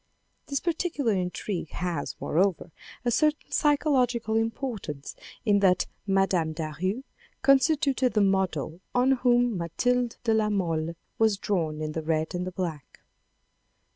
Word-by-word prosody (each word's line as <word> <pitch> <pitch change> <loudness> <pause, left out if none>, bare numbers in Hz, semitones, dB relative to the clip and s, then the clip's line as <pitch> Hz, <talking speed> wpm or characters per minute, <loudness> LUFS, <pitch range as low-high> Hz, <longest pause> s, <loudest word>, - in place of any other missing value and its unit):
This 280 -1 -1
particular 320 -8 0
intrigue 180 -1 -3
has, 175 -4 -3
moreover, 180 0 0 0.3
a 240 - +2
certain 305 +4 +1
psychological 260 -7 +2
importance 225 - -3 0.3
in 205 -2 +4
that 185 -2 +3 0.2
Mme. 195 -5 +2
Daru 170 - -3 0.4
constituted 275 -2 +3
the 210 - +3
model 185 -5 0 0.2
on 250 +2 +4
whom 245 -4 +3
Mathilde 245 +8 0
de 225 -2 +2
la 215 -1 +2
Mole 165 -5 -1 0.2
was 220 -3 +3
drawn 160 -7 -1
in 155 - -3
The 160 - -3
Red 155 0 -1
and 180 0 -2
the - - -4
Black. 170 -6 -5
200 Hz, 130 wpm, -27 LUFS, 170-245 Hz, 0.4 s, in